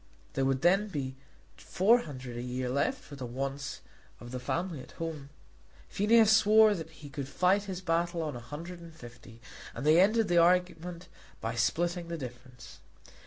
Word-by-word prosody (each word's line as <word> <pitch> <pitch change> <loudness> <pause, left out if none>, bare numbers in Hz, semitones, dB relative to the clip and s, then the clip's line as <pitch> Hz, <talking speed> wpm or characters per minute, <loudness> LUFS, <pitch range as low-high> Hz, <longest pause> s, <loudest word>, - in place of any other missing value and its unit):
There 135 - 0
would 135 +1 0
then 195 +4 +4
be 135 -8 -4 0.4
four 215 +6 +3
hundred 130 - -8
a 120 - -4
year 125 +1 -3
left 145 - 0
for 145 - -11
the 130 -3 -6
wants 135 +3 -4 0.4
of 120 - -10
the 130 - -4
family 165 +3 -3
at - - -14
home. 155 -4 -6 0.6
Phineas 220 +1 +5
swore 215 0 +6
that 165 -5 -6
he 155 -2 -12
could 135 -1 -5
fight 185 +7 +2
his 190 -2 -5
battle 170 -1 0
on 150 -4 -4
a - - -6
hundred 165 +8 -8
and 165 -1 -12
fifty, 120 -4 -13 0.3
and - - -5
they 155 +3 +6
ended 215 +3 +3
the 175 -1 +4
argument 180 0 +1 0.3
by 115 +1 -3
splitting 175 +8 0
the 170 0 -4
difference. 125 -2 -10
165 Hz, 175 wpm, -30 LUFS, 130-180 Hz, 0.6 s, swore